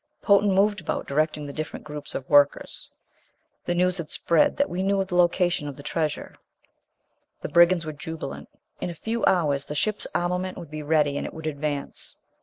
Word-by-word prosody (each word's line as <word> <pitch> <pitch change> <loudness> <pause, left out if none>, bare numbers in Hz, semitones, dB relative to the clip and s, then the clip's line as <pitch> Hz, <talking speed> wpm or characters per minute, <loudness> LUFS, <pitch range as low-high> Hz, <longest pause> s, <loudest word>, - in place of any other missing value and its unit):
Potan 200 -1 +5
moved 205 +1 +3
about, - - -3
directing 150 +1 0
the 140 - -7
different 155 0 -5
groups 150 -1 -7
of 135 - -4
workers. 145 -1 +3 0.8
The 175 - 0
news 180 +1 +2
had 160 - -5
spread 170 -2 +2
that 285 - +2
we 180 - -3
knew 195 0 +2
the 185 - -8
location 175 -3 +2
of 140 -2 -7
the 145 - -10
treasure. 155 0 -2 1.1
The - - -4
brigands 170 0 +5
were 155 - -4
jubilant. 160 -2 -7 0.3
In - - -3
a 170 - -6
few 225 +7 -3
hours 145 -6 +2
the 150 - -6
ship's 215 +7 0
armament 180 +1 -1
would 165 -3 -9
be 155 0 -5
ready, 150 -1 +2
and - - -3
it - - -9
would 160 0 -8
advance. 145 -1 -3
160 Hz, 190 wpm, -25 LUFS, 150-180 Hz, 1.1 s, Potan